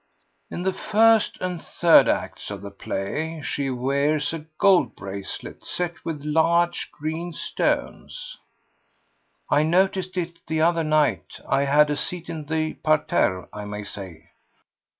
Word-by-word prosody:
"In 175 - -5
the 190 0 +1
first 220 +2 +3
and 180 -2 -3
third 170 -2 +5
acts - - -2
of 100 -1 -6
the 100 - -7
play 150 +12 -4
she 140 -1 -1
wears 140 +4 0
a 160 -1 -6
gold 185 - +4
bracelet 100 0 -7
set 175 -1 -3
with 150 -3 -5
large 170 +3 +2
green 160 +3 -4
stones." - - -2 1.1
"I 145 - +5
noticed 185 +3 +1
it 170 -1 -3
the 160 0 -1
other 165 +1 +3
night. 155 -1 +1
I 135 +1 +2
had 150 +2 +4
a - - +1
seat 175 +3 -3
in 155 -2 -6
the 155 +1 -1
parterre, 150 -11 +1
I 105 - -6
may 105 0 -5
say." 90 -5 -9
155 Hz, 140 wpm, -24 LUFS, 140-170 Hz, 1.1 s, third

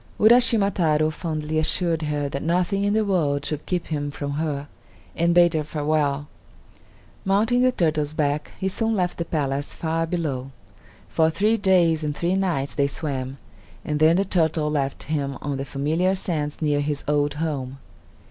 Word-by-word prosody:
Uraschima 220 -3 +5
Taro 155 -3 +2
fondly 155 -1 -2
assured 165 +1 0
her 150 -1 -1
that 140 0 -4
nothing 180 +4 0
in 205 0 +1
the 220 -1 +2
world 145 -7 +1
should 150 0 -4
keep 180 -2 -1
him 145 -2 -3
from 145 0 -5
her, 145 -1 -2 0.5
and 170 +1 +2
bade 175 -1 +6
her 155 -1 0
farewell. 145 -1 -1 1.0
Mounting 220 +6 +2
the 255 0 +4
turtle's 155 -7 0
back, 150 -1 -1
he 190 - -1
soon 225 +3 0
left 180 -3 -1
the 170 - -1
palace 140 -3 -2
far 165 0 -1
below. 145 -7 -2 0.6
For 160 0 +2
three 210 +7 +2
days 180 -6 +3
and 150 -1 -2
three 170 +2 0
nights 170 -8 -1
they 140 -1 +1
swam, 135 -2 -4 0.5
and 150 0 -1
then 160 +2 +5
the 195 +2 +2
turtle 160 -4 +1
left 140 -2 -2
him 140 -2 -2
on 145 -2 -3
the 135 - -4
familiar 160 +8 0
sands 155 -5 -3
near 145 -1 +2
his 145 0 -2
old 145 0 +1
home. 140 -4 -3
155 Hz, 170 wpm, -23 LUFS, 145-180 Hz, 1.0 s, bade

